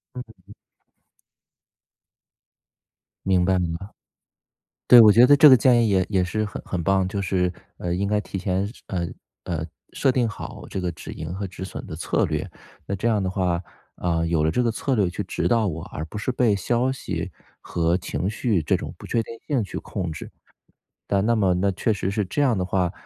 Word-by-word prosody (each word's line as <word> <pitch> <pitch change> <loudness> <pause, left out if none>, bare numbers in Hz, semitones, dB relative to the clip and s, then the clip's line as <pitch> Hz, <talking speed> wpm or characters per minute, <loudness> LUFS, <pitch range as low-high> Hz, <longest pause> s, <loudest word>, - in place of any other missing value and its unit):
嗯。 110 -6 -11 2.7
明 95 -2 +3
白 95 +1 +2
明 85 -2 -1
白。 95 +4 -7 1.0
对， 125 - +10
我 110 -2 +9
觉 115 +4 +7
得 145 +2 +7
这 150 - +9
个 130 - +9
建 120 0 +4
议 - - +2
也 95 -2 +3
也 95 -3 +1
是 110 +4 -1
很 105 - -6
很 90 -2 -3
棒。 95 +2 +2
就 100 +1 -3
是 90 -1 0 0.3
呃， 85 -1 -2
应 100 +3 -1
该 105 +1 +1
提 100 - -6
前 95 +1 -1
设 105 - -8 0.2
呃， 85 -3 -2 0.4
呃， - - -3 0.3
设 135 - +2
定 125 -2 +1
好 105 - -8
这 95 - -4
个 90 -1 -1
止 80 - -9
盈 80 +2 -6
和 100 +1 -4
止 95 0 -8
损 95 - -7
的 - - -7
策 - - 0
略。 - - -3 0.4
那 100 - -2
这 100 +5 -1
样 105 -3 +1
的 95 - -1
话， 90 -3 0 0.4
呃， 85 -2 0
有 80 -2 +1
了 80 - +2
这 125 - +1
个 120 - +1
策 130 +4 -1
略 100 -6 +2
去 85 - -4
指 - - -1
导 115 -2 +2
我， 80 -4 -3
而 80 - -4
不 85 - -10
是 105 - -2
被 120 -4 +2
消 120 +6 0
息 135 - -4 0.3
和 85 0 0
情 90 0 -3
绪 105 -4 0
这 - - +2
种 - - -7
不 - - -10
确 115 - 0
定 115 - -9
性 140 -6 +1
去 95 - -6
控 90 -5 -4
制。 80 - -8 0.8
但 100 0 +1
那 115 +1 +3
么 95 -4 +2
那 100 +2 +1
确 95 +4 0
实 95 -2 -1
是 105 +1 0
这 95 - -4
样 130 -5 +3
的 95 - -1
话 90 -1 0
95 Hz, 225 characters per minute, -24 LUFS, 90-115 Hz, 2.7 s, 对